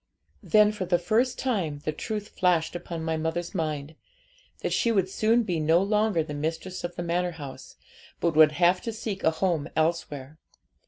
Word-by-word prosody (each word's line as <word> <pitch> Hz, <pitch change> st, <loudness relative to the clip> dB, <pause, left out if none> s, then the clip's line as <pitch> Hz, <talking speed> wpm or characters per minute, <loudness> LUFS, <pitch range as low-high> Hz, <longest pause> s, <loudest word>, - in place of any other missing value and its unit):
Then 210 Hz, -1 st, +4 dB
for 210 Hz, -3 st, -4 dB
the 175 Hz, 0 st, +2 dB
first 220 Hz, +9 st, +1 dB
time 195 Hz, -, -1 dB
the 155 Hz, -, +1 dB
truth 210 Hz, +5 st, -5 dB
flashed 175 Hz, -3 st, +1 dB
upon 170 Hz, -1 st, -5 dB
my 160 Hz, 0 st, -1 dB
mother's 160 Hz, +2 st, -3 dB
mind, 155 Hz, -4 st, -3 dB, 0.7 s
that -, -, -1 dB
she 235 Hz, -, +2 dB
would 195 Hz, -4 st, +2 dB
soon 220 Hz, +5 st, +2 dB
be 175 Hz, -6 st, -1 dB
no 160 Hz, +2 st, +4 dB
longer 210 Hz, -3 st, +2 dB
the 150 Hz, -, -7 dB
mistress 160 Hz, +5 st, -4 dB
of 175 Hz, 0 st, -4 dB
the 175 Hz, -, -4 dB
manor 175 Hz, +1 st, 0 dB
house, 145 Hz, -5 st, -9 dB, 0.4 s
but 170 Hz, -2 st, 0 dB
would 155 Hz, -1 st, +7 dB
have 175 Hz, +3 st, +3 dB
to 230 Hz, -, -4 dB
seek 215 Hz, -3 st, -5 dB
a -, -, +5 dB
home 160 Hz, -2 st, -1 dB
elsewhere. 155 Hz, -3 st, -1 dB
175 Hz, 180 wpm, -27 LUFS, 160-200 Hz, 0.7 s, would